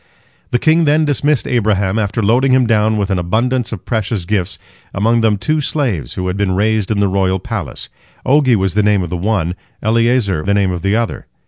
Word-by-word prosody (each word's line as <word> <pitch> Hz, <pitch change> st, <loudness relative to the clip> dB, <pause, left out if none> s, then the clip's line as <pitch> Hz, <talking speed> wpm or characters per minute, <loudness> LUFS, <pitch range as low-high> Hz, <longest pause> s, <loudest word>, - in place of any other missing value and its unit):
The 120 Hz, -, +1 dB
king 160 Hz, +5 st, +3 dB
then 155 Hz, +1 st, +3 dB
dismissed 145 Hz, -1 st, 0 dB
Abraham, 105 Hz, -4 st, 0 dB
after 105 Hz, +1 st, -1 dB
loading 125 Hz, +6 st, +3 dB
him 130 Hz, -1 st, +4 dB
down 110 Hz, -1 st, +2 dB
with 100 Hz, -1 st, -1 dB
an 95 Hz, -, 0 dB
abundance 115 Hz, +7 st, -1 dB
of 105 Hz, -6 st, -7 dB
precious 110 Hz, -5 st, -2 dB
gifts, 95 Hz, -1 st, -2 dB, 0.4 s
among 115 Hz, +4 st, +2 dB
them 110 Hz, -2 st, +2 dB
two 155 Hz, +8 st, 0 dB
slaves 120 Hz, -, -2 dB
who 90 Hz, -, -3 dB
had 90 Hz, +1 st, -2 dB
been 100 Hz, -2 st, 0 dB
raised 105 Hz, +1 st, 0 dB
in 105 Hz, -2 st, 0 dB
the 100 Hz, -, +2 dB
royal 95 Hz, 0 st, 0 dB
palace. -, -, -5 dB, 0.4 s
'Ogi 130 Hz, -2 st, +4 dB
was 95 Hz, -3 st, 0 dB
the 105 Hz, -, +2 dB
name 105 Hz, -2 st, +2 dB
of 85 Hz, -, -6 dB
the -, -, -2 dB
one, 90 Hz, -2 st, -1 dB, 0.3 s
Eliezer 115 Hz, -5 st, +1 dB
the 100 Hz, +4 st, 0 dB
name 100 Hz, -2 st, +1 dB
of 90 Hz, -2 st, -4 dB
the 100 Hz, +3 st, +1 dB
other. 115 Hz, 0 st, -3 dB
105 Hz, 210 wpm, -16 LUFS, 95-120 Hz, 0.4 s, him